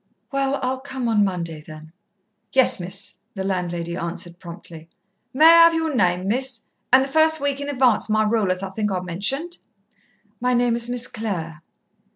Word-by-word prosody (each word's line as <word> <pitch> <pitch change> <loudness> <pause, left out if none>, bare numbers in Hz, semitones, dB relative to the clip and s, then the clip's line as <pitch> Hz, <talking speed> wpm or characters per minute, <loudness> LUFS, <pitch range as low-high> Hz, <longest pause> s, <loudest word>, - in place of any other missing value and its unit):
"Well, 275 0 0
I'll 260 +1 -1
come 260 -2 -5
on 215 -3 +3
Monday, 170 -5 -3
then." 155 +1 -12 0.6
"Yes, 260 -6 +5
Miss," 185 +3 -4 0.2
the 190 - -3
landlady 175 -3 -3
answered 170 0 -5
promptly. 170 -1 -11 0.4
"May 300 +5 +4
I - - +10 0.2
have 335 0 +4
your 320 -2 -1
name, 180 -3 +1
Miss? 250 +2 -2 0.3
and 260 +1 +6
the - - -4
first 315 +2 +3
week 280 0 -2
in 285 - -4
advance 250 -6 +2
my 215 0 +2
rule, 215 -3 +1
as 185 +1 -3
I 190 - -5
think 210 +1 -2
I 185 - -1
mentioned." 240 - -2 0.8
"My 250 0 +1
name 240 -1 +2
is 235 0 -2
Miss 245 0 -1
Clare." 170 -10 -5
215 Hz, 180 wpm, -22 LUFS, 180-265 Hz, 0.8 s, I